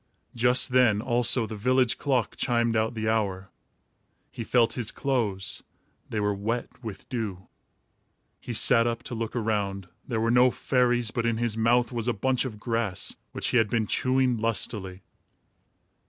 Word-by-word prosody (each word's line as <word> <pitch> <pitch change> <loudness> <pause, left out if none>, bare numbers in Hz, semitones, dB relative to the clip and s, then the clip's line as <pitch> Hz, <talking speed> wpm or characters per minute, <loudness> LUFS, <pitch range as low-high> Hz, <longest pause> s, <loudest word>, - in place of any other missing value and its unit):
Just 125 +2 +2
then 125 -5 +4
also 120 0 +3
the 110 - -7
village 125 +3 +1
clock 130 -6 0
chimed 115 -1 0
out 110 +1 0
the 110 -1 -3
hour. 100 -4 -1 0.8
He 115 - -6
felt 115 0 +2
his 115 -3 -1
clothes. 110 -8 -1 0.5
They 110 - -2
were 105 0 0
wet 115 +5 -4
with 110 -4 -8
dew. 105 -8 -5 0.9
He - - -8
sat 115 +1 +5
up 115 0 -3
to - - -7
look 115 0 -4
around. 100 -4 -2 0.2
There 115 -4 -2
were 115 +1 +1
no 125 +1 +5
fairies, 120 -3 +1
but 115 0 -1
in 115 -1 0
his 115 -2 -1
mouth 120 +2 +2
was 120 -1 -3
a 120 - +2
bunch 130 +5 0
of 110 -5 -6
grass 115 -5 -2 0.2
which - - -2
he - - +2
had 110 -3 +2
been 115 -1 0
chewing 130 +2 +1
lustily. 105 -4 -2
115 Hz, 165 wpm, -26 LUFS, 110-125 Hz, 0.9 s, sat